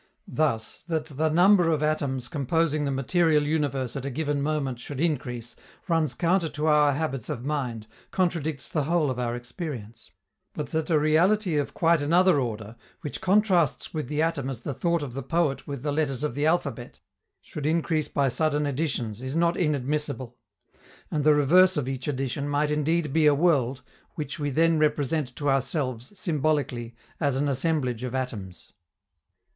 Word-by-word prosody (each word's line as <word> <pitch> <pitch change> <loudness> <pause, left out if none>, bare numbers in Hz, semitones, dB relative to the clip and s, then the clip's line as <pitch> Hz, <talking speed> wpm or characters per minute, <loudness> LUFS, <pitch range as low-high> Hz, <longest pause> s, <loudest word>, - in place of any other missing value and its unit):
Thus, 135 -8 -1
that 160 -3 -1
the 155 +1 -1
number 175 +2 +5
of 155 -2 +1
atoms 140 -5 -1
composing 150 +2 0
the - - 0
material 150 +3 +2
universe 140 -5 -1
at 135 - -4
a 140 - -3
given 145 +1 -1
moment 140 -4 -1
should 135 +2 -7
increase 125 -7 -2 0.3
runs 160 -7 +1
counter 170 +1 +1
to 150 +1 -3
our 150 -2 +4
habits 135 -5 -3
of 130 -5 -4
mind, 125 -7 -2 0.2
contradicts 165 -6 -1
the 150 -4 -1
whole 160 -3 +1
of 125 - -4
our 120 -1 -1
experience; 120 -2 -7 0.5
but - - -4
that 160 +1 -2
a 160 - +4
reality 170 +5 +3
of 145 -1 -1
quite 165 -2 +3
another 170 +2 +4
order, 110 -2 -5 0.2
which 150 - -6
contrasts 190 -4 +2
with 155 -5 -3
the 150 +3 0
atom 145 -5 -1
as 125 -4 -5
the 140 - -4
thought 170 +3 0
of 130 -4 -6
the 135 - -4
poet 165 -4 -1
with 140 -3 -5
the 150 - -1
letters 145 -3 -1
of 150 - -1
the 145 +4 0
alphabet, 140 -8 -1 0.4
should 150 -1 -5
increase 160 -1 +1
by 140 -1 +1
sudden 150 +3 +1
additions, 125 -6 -2
is 130 +2 -4
not 170 +1 +2
inadmissible; 145 -5 -1 0.8
and 150 -2 0
the 150 0 +5
reverse 180 +5 +5
of 140 -4 -1
each 135 0 -4
addition 140 +1 -2
might 145 +1 +1
indeed 150 0 0
be 160 -1 +4
a 145 - +5
world, 140 -5 +2 0.3
which 155 0 -5
we 145 -1 -1
then 165 +3 +3
represent 150 -3 0
to 145 - -3
ourselves, 135 - -1
symbolically, 145 -8 -1 0.2
as 140 -4 +1
an 140 +2 0
assemblage 135 -4 0
of 125 0 -4
atoms. 105 -9 -5
145 Hz, 175 wpm, -26 LUFS, 130-160 Hz, 0.8 s, number